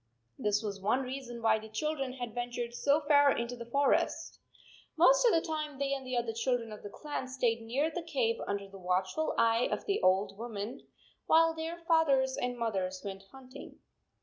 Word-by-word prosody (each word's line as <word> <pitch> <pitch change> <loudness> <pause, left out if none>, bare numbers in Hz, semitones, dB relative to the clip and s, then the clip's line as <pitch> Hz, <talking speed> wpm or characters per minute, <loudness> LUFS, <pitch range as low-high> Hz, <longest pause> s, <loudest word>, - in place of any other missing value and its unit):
This 210 +1 +1
was 200 -2 -4
one 230 +7 +1
reason 250 -2 -6
why 220 -1 +4
the 220 0 -11
children 275 +1 -2
had 245 -3 -6
ven 245 0 -3
tured 240 -1 -4
so 285 +5 +2
far 285 -1 +5
into 235 +1 -3
the 235 -1 -9
forest. 280 +3 +1 0.6
Most - - +6
of - - +5
the 330 -2 +1
time 305 -3 -3
they 275 0 0
and 270 -1 -3
the 255 -1 -3
other 235 -1 -1
children 230 -1 -1
of 210 - -9
the 205 - -8
clan 290 +3 -5
stayed 245 -3 0
near 270 +8 -1
the 350 - -4
cave 260 -9 0
under 200 0 -3
the 195 0 -12
watchful 185 +11 -1
eye 230 +1 +3
of - - -2
the 400 - 0
old 190 +2 +2
woman, 230 +2 -6 0.4
while 325 0 +5
their 325 +1 -5
fathers 275 -6 +3
and 245 0 -2
mothers 190 -5 -2
went 195 -1 -5
hunting. 265 0 -12
245 Hz, 195 wpm, -31 LUFS, 220-285 Hz, 0.6 s, Most